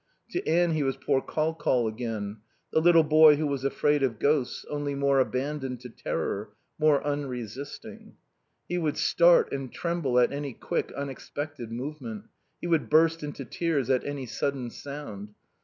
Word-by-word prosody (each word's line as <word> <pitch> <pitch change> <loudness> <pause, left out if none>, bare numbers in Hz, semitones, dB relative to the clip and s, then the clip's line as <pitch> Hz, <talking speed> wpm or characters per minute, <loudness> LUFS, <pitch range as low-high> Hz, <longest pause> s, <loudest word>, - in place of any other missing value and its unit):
To 360 - -2
Anne 175 0 +3
he 155 -1 0
was 135 -1 0
"poor 135 0 +1
Col 155 +3 -1
Col" 130 -7 +1
again, 110 -2 -4 0.4
the - - +5
little 165 -1 +6
boy 155 0 +7
who 155 +2 -1
was 140 -2 -2
afraid 145 +1 +2
of 125 -5 0
ghosts, 140 0 0
only 145 -1 -3
more 140 0 +3
abandoned 130 0 -1
to 125 - -8
terror, 105 -2 -3 0.3
more 150 -2 +3
unresisting. 135 -3 -5 0.5
He 175 - -1
would 155 -3 -1
start 170 0 +5
and 135 -3 -4
tremble 170 -7 -1
at 125 - +4
any 140 -2 -4
quick, - - -3
unexpected 140 -2 -6
movement. 120 -4 -6 0.3
He - - -7
would 165 -3 +1
burst 165 +1 +4
into 145 -2 -6
tears 145 -6 -1
at 130 - +2
any 145 -2 -4
sudden 125 0 -2
sound. 110 -9 -8
140 Hz, 160 wpm, -27 LUFS, 125-155 Hz, 0.5 s, boy